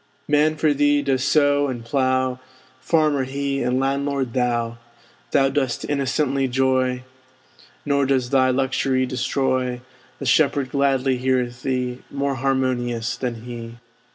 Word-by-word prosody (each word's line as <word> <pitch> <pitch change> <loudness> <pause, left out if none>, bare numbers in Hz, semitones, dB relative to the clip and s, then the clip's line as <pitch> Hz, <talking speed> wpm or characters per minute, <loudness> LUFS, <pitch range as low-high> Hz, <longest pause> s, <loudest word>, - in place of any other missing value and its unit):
Man 150 +1 +3
for 155 -1 +2
thee 145 0 +2
does 135 -2 0
sow 145 -1 +3
and 120 -3 -5
plow; 130 0 0 0.4
Farmer 150 -2 +2
he, 140 +1 -2
and 125 +1 0
landlord 135 -2 -1
thou! 120 -2 -1 0.5
Thou 135 -1 +3
dost 135 -3 -1
innocently 140 -1 0
joy; 130 0 +1 0.8
Nor 140 -1 +1
does 130 -2 0
thy 130 -1 +4
luxury 130 0 +1
destroy; 130 -1 -1 0.4
The - - -6
shepherd 135 -2 +2
gladly 135 -2 +1
heareth 125 -1 -1
thee, 125 -1 -2
More 140 0 -1
harmonious 125 -3 -1
than 120 -3 -4
he. 115 -1 -8
130 Hz, 125 wpm, -22 LUFS, 125-140 Hz, 0.8 s, thy